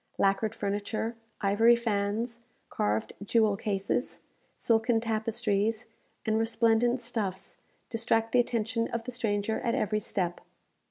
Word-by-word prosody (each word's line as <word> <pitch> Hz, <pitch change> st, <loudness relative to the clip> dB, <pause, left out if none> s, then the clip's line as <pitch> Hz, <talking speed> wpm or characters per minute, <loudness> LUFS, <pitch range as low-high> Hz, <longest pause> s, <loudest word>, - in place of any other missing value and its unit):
Lacquered 200 Hz, +3 st, +1 dB
furniture, 205 Hz, +3 st, -2 dB, 0.3 s
ivory 225 Hz, +4 st, +5 dB
fans, 225 Hz, +1 st, -1 dB, 0.3 s
carved 105 Hz, +1 st, -1 dB
jewel 215 Hz, 0 st, +3 dB
cases, 200 Hz, +3 st, -2 dB, 0.4 s
silken 225 Hz, 0 st, +2 dB
tapestries, 220 Hz, 0 st, 0 dB, 0.4 s
and 220 Hz, 0 st, +2 dB
resplendent 230 Hz, +2 st, +2 dB
stuffs, 210 Hz, -6 st, -3 dB, 0.3 s
distract 225 Hz, -1 st, +1 dB
the 250 Hz, -, +4 dB
attention 230 Hz, -1 st, 0 dB
of 235 Hz, 0 st, -3 dB
the 250 Hz, -, -5 dB
stranger 220 Hz, -3 st, -1 dB
at 235 Hz, +1 st, 0 dB
every 215 Hz, -4 st, 0 dB
step. 180 Hz, -4 st, -2 dB
225 Hz, 115 wpm, -29 LUFS, 205-235 Hz, 0.4 s, ivory